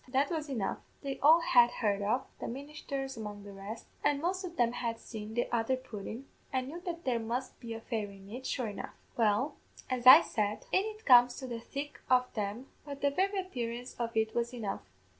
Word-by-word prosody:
That 270 +4 +1
was 310 -3 -2
enough; 230 -8 -1 0.2
they 275 -1 -3
all 320 +4 +7
had 245 -6 +6
heard 205 -4 0
of 220 +6 +1
the - - -4
ministhers 275 0 -5
among 210 -2 -6
the 200 0 -10
rest 200 +4 -7 0.2
an' 285 -1 +3
most 370 +4 -1
o' 365 - -3
them 240 -9 +1
had 235 -1 -2
seen 220 -1 -8
the 240 - +1
other 235 +3 +1
pudden, 235 0 -7 0.3
and 260 0 -1
knew 340 +4 -7
that 340 -1 -4
there 245 -3 +1
must 240 +3 -3
be 230 -1 -6
a 225 - -7
fairy 210 -4 -3
in 195 0 -14
it, 255 +3 -5
sure 245 -5 -1
enough. 205 - -7 0.2
Well, 225 +5 +2 0.3
as 255 -1 0
I 280 +6 +13
said, 210 -7 -2
in 380 - +3
it 435 0 -7
comes 245 -1 +7
to 265 - -6
the 235 -2 -4
thick 280 +5 -6
o' 250 0 +5
them; 215 +4 -3 0.2
but 280 -2 -8
the 285 - +3
very 390 +6 +1
appearance 245 -9 -4
of 230 -1 -2
it 220 0 +2
was 235 +1 -1
enough. 215 -5 -3
245 Hz, 215 wpm, -32 LUFS, 225-280 Hz, 0.3 s, I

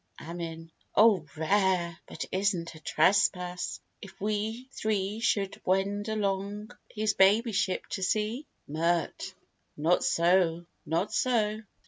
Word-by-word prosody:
AMIN. 165 0 -7 0.2
O 205 -7 +5
rare! 175 0 +1
But 160 - -5
is't 185 -3 0
a 155 - -12
trespass, 180 +2 +1 0.2
if 195 -1 -12
we 215 +4 -2
three 210 -2 -1
Should 200 -3 0
wend 200 +3 0
along 205 +1 -2 0.2
his 215 0 0
baby 210 +5 +4
ship 190 -2 0
to 190 - -4
see? 215 +8 -1 0.2
MIRT. 165 +3 -1 0.4
Not 165 +4 +2
so, 170 -1 +2 0.2
not 165 +6 -1
so. 220 -4 +1
195 Hz, 115 wpm, -29 LUFS, 170-210 Hz, 0.4 s, O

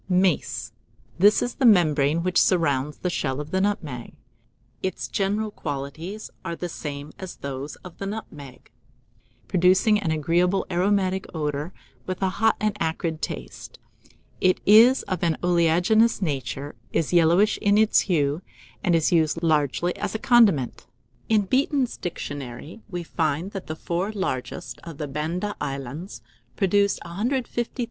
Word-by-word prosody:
] - - -33 0.2
MACE. 125 -9 -1 0.5
This 205 +3 +5
is 245 - -3
the 265 - 0
membrane 160 -5 +4
which 180 0 +3
surrounds 150 -5 +1
the 180 - -2
shell 135 -4 -2
of 150 +1 -6
the 190 - +1
nutmeg. 160 - -2 0.7
Its 190 - -3
general 210 +1 -1
qualities 155 +7 -6
are 170 -2 -4
the 175 +1 -5
same 145 -2 -6
as 190 -2 -7
those 140 +1 -6
of 180 - -11
the 195 - -3
nutmeg, 145 - -8 0.8
producing 190 +4 +4
an 190 -5 -2
agreeable 170 +5 +1
aromatic 190 +1 +1
odour, 150 +1 -2 0.4
with 185 -1 -3
a 190 - +3
hot 225 0 +4
and 215 0 0
acrid 160 -1 -2
taste. - - -6 0.6
It 185 0 +3
is 230 +6 +7
of 185 -3 -3
an 165 -3 +1
oleaginous 180 +6 +3
nature, 145 -4 -3 0.2
is 165 +1 0
yellowish 175 +5 +4
in 205 0 +3
its 215 0 +5
hue, 150 -2 +1 0.4
and 175 - +3
is 160 -2 +2
used 165 0 +2
largely 160 +2 +1
as - - -3
a - - -1
condiment. 205 - +3 0.4
In 215 -2 +4
"Beeton's 260 +4 +1
Dictionary" 145 - -6
we 175 -1 -4
find 160 +2 -1
that 195 -3 -7
the 155 - -4
four 175 +5 -2
largest 130 - -4
of 165 -4 -9
the 150 - -4
Banda 165 +8 -3
Islands 140 +5 -5 0.3
produce 200 +1 +2
150,000 235 +6 -2
lbs. - - -15
175 Hz, 150 wpm, -24 LUFS, 150-200 Hz, 0.8 s, is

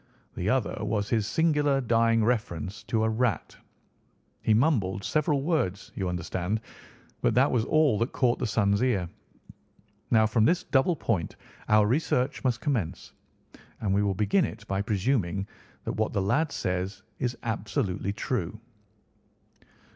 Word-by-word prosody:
The - - -2
other - - 0
was 105 -2 -1
his 110 -3 +1
singular 150 0 +2
dying 115 -2 +2
reference 105 -6 -2
to 110 -1 0
a 110 - +2
rat. 115 -1 -1 0.9
He - - +1
mumbled 105 -6 +2
several 150 - +1
words, 125 - -1
you 95 -2 -2
understand, 90 +4 -2 0.6
but 120 -3 +2
that 135 +3 +4
was 115 -3 +1
all 155 -8 +3
that 115 +3 0
caught 125 -3 +1
the - - -1
son's 100 -1 +2
ear. 115 -9 +1 1.0
Now 110 -2 +5
from 110 0 +2
this 180 +5 +2
double 145 +4 +2
point 105 - -2 0.3
our 105 -1 +5
research 130 +3 0
must 125 -2 0
commence, 120 - -2 0.7
and 100 -3 0
we 100 - +3
will 100 -2 0
begin 110 - +2
it 110 -6 -5
by 95 0 -1
presuming 100 -2 0 0.4
that - - -3
what - - -1
the 100 - +1
lad 150 +10 +1
says 95 -4 -3 0.2
is 125 -1 -2
absolutely 100 -3 -2
true." 105 -2 -3
110 Hz, 145 wpm, -27 LUFS, 100-130 Hz, 1.0 s, Now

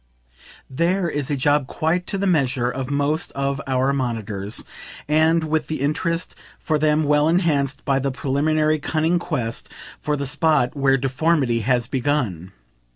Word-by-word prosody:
THERE 170 +6 0
is 145 -3 -3
a 145 - +1
job 145 0 +2
quite 175 +4 -1
to 195 - -1
the 195 - -1
measure 130 -8 +1
of 130 0 -4
most 145 +3 0
of 140 0 -2
our 130 +1 +1
monitors 110 -6 -3 0.4
and 160 +2 +3
with 155 -1 -1
the 155 -2 -3
interest 165 +5 -1 0.2
for 155 -2 -1
them 155 +1 +2
well 150 +1 +3
enhanced 145 -6 +1
by 135 -2 +2
the 135 +1 -1
preliminary 155 +3 +1
cunning 160 +3 +1
quest 125 -10 -3 0.3
for 150 0 -1
the 140 - -3
spot 145 -2 +2
where 135 -1 +3
deformity 135 -2 +1
has 120 +1 +1
begun. 120 - -2
145 Hz, 155 wpm, -22 LUFS, 130-155 Hz, 0.4 s, and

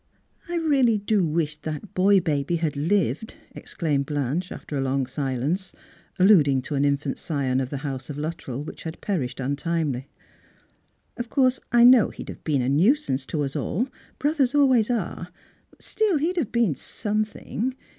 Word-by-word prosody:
" - - -29
I 350 - -2
really 275 -9 +3
do 205 -3 +1
wish 150 -1 -1
that 155 +6 -6
boy 195 +1 +5
bal>y 155 -1 -1
had 160 -3 -1
lived," 165 - 0 0.2
exclaimed 145 -5 -2
Blanche 145 +5 -2
after 150 - -7
a 135 - 0
long 135 0 0
silence, 140 +7 -2 0.4
alluding 150 -9 +5
to 145 - -5
an 140 0 +1
infant 140 0 0
scion 135 -5 -1
of 130 -1 -2
the 140 +1 -5
house 135 -2 -4
of 145 - -5
Luttrell 150 -4 -4
which - - -9
had 160 0 -7
jDerished 135 -9 -2
untimely. 145 -2 -1 0.6
" - - -41
Of 240 -1 -4
course, 260 -2 +2
I 240 0 +6
know 245 -2 +7
he'd - - -9
have - - -9
been 140 -5 +1
a - - -1
nuisance 150 - +2
to 150 -2 -1
us 135 -1 -4
all 245 +9 -1
— - - -29
brothers 290 -3 +1
always 260 -6 +4
are 200 -7 -2 0.2
— - - -37
but - - -15
still 425 -6 +1
^e'd 335 +5 -1
have 265 -10 -1
been 235 -8 +2
something. 215 - -3
165 Hz, 180 wpm, -24 LUFS, 140-225 Hz, 0.6 s, know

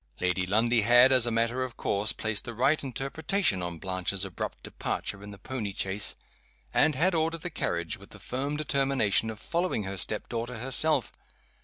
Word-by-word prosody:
Lady 90 0 0
Lundie 115 +4 +3
had, 120 +4 +7
as 125 -2 +5
a - - +2
matter 115 +3 +1
of 125 -3 -7
course, 100 +1 0
placed 110 -2 -2
the 120 -2 -6
right 140 +7 +2
interpretation 140 - -1
on 90 -1 -4
Blanche's 95 +2 -1
abrupt 90 -3 -6
departure 100 - -4
in 100 - -9
the 100 - -10
pony 105 -1 -5
chaise, 95 +2 0 0.6
and 150 -1 +4
had 180 +7 +3
ordered 165 0 0
the 175 - -4
carriage, 85 - -2
with 100 - -14
the - - -12
firm 135 +8 -3
determination 135 -7 +1
of 110 -2 -7
following 170 - -1
her 95 0 -5
step 105 - 0
daughter 120 +1 -4
herself. 135 +6 +1
115 Hz, 180 wpm, -28 LUFS, 100-135 Hz, 0.6 s, had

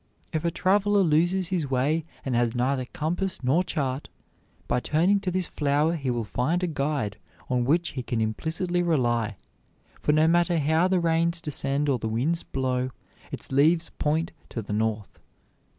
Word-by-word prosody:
If 155 0 -1
a 170 - +2
traveler 200 +3 +2
loses 175 +3 +2
his 170 -7 -1
way 145 +5 +1 0.2
and 130 -3 -1
has 120 0 +1
neither 130 +1 0
compass 170 +4 -3
nor 145 +8 +3
chart, 135 -5 -3 0.6
by - - +1
turning 175 +10 +2
to 195 -2 -2
this 185 0 -1
flower 150 +2 +1
he 140 -5 -3
will 120 -2 -1
find 125 - -1
a - - +2
guide 140 -9 -2 0.3
on 125 -1 +1
which 165 +6 +2
he 130 - -5
can 120 -1 -2
implicitly 160 - -1
rely; 120 - +1 0.6
for - - +2
no 155 +1 +4
matter 175 +1 +3
how 160 +4 +3
the 185 -1 +2
rains 170 0 +1
descend 145 -2 -1
or 135 -3 +1
the 110 - -3
winds 140 +10 +1
blow, 130 -1 -1 0.4
its - - -8
leaves 160 +5 +3
point 160 +3 0 0.2
to 115 - -5
the 105 - -5
north. 110 -1 -2
150 Hz, 170 wpm, -26 LUFS, 125-170 Hz, 0.6 s, no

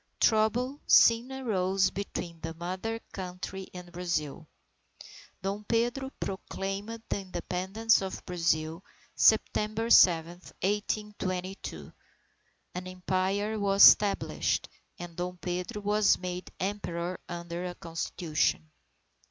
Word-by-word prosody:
Trouble 240 +5 +2
soon 235 +3 +6
arose 195 -7 +1
between 175 -4 -5
the 165 +1 -5
Mother 185 +7 -4
Country 185 +1 -6
and 180 -1 -10
Brazil. 165 -3 -3 1.0
Dom 200 +2 -2
Pedro 240 +4 0
proclaimed 195 +3 -4
the - - -1
Independence 190 +4 0
of 190 -1 -5
Brazil, 165 -1 -1 0.3
September 220 +1 +2
7, 165 -2 +6 0.3
1822. 200 -2 -3 0.8
An 180 +1 -5
Empire 190 +3 -1
was 200 0 +7
established, 205 -1 +2 0.3
and 175 -1 -8
Dom 180 +1 -4
Pedro 180 +3 -4
was 210 0 +4
made 180 0 -5
Emperor 180 -3 -3
under 170 0 -5
a 175 - -6
Constitution. 165 -1 -1
190 Hz, 100 wpm, -29 LUFS, 175-210 Hz, 1.0 s, was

